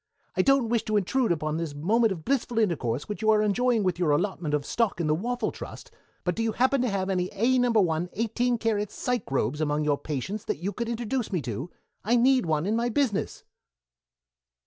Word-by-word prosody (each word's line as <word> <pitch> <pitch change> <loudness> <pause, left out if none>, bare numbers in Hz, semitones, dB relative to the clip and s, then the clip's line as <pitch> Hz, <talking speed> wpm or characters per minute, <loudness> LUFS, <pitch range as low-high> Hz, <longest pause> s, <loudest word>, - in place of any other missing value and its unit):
"I - - +3
don't 275 -4 +3
wish 235 -1 +2
to 215 -1 +1
intrude 230 +4 +1
upon 155 -1 -1
this 165 -3 -4
moment 215 +9 +2
of 170 -4 -5
blissful 245 -3 0
intercourse 145 - 0
which 210 +1 -5
you 220 - +2
are 215 -1 +5
enjoying 225 +2 +2
with 180 -2 0
your 175 -4 +2
allotment 155 -1 0
of 145 -1 -2
stock 230 -6 0
in 170 - 0
the 155 - +2
Waffle 240 +9 -1
Trust, - - -9 0.3
but 180 - 0
do 225 - -3
you 225 -1 0
happen 260 +1 +2
to 250 - +1
have 195 -2 -1
any 185 -2 0
A 240 +6 +2
No. 245 0 +3
1 180 -6 +2
eighteen 235 +3 0
karat 210 -2 0
psychrobes 150 - -2
among 150 0 0
your 145 -1 +1
patients 155 - -4
that - - -2
you 190 +6 -3
could 235 -1 -3
introduce 235 0 -2
me 180 - 0
to? 125 - -4 0.3
I 230 +4 +2
need 255 -3 +4
one 155 0 +1
in 210 +3 +1
my 235 +1 +1
business." 240 -4 -1
210 Hz, 215 wpm, -27 LUFS, 165-235 Hz, 0.3 s, are